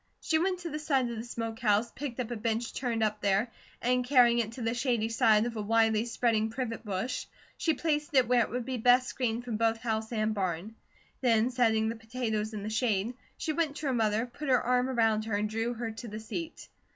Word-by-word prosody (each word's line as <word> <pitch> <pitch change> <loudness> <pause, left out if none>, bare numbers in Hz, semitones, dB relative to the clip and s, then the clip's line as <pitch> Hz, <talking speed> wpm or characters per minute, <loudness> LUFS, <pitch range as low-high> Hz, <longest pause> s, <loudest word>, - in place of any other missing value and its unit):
She 315 - +1
went 365 +1 0
to 335 -2 -5
the 300 - -3
side 275 -5 +1
of - - -4
the 220 - -5
smoke 230 -2 -5
house, 220 0 +2
picked 265 -3 -6
up 245 -1 -3
a - - -2
bench 225 +1 -2
turned 235 -3 -1
up 215 -1 -1
there, 200 +4 +1 0.3
and 250 +1 +2
carrying 245 -2 +5
it 225 -1 -1
to 245 - -6
the 225 0 0
shady 240 -3 0
side 220 -1 +4
of 240 -1 -4
a 215 - -2
widely 225 +1 +2
spreading 230 -2 +1
privet 230 -1 -4
bush, 215 +5 -3 0.3
she 320 -2 +1
placed 300 -2 -1
it 255 -3 +5
where 245 0 +4
it - - 0
would 245 0 -3
be 260 -1 -3
best 245 +2 +5
screened 240 -2 -2
from 230 -3 -2
both 225 0 +2
house 220 -1 -2
and 215 -1 0
barn. 190 +1 -2 0.5
Then 235 -1 +3
setting 225 -3 +2
the 225 - -2
potatoes 225 -2 -3
in 210 -2 -5
the 215 - -3
shade, 220 -1 0 0.2
she 315 - -2
went 315 -3 0
to 305 - -6
her 270 - +1
mother, 220 -1 +1
put 275 +4 -7
her 255 -2 +5
arm 250 +1 +2
around 225 -3 +2
her, 220 -2 -1
and 210 +1 0
drew 225 +3 -2
her 230 -1 -3
to 225 +2 -8
the 215 0 -6
seat. 320 +9 -6
230 Hz, 235 wpm, -30 LUFS, 220-250 Hz, 0.5 s, carrying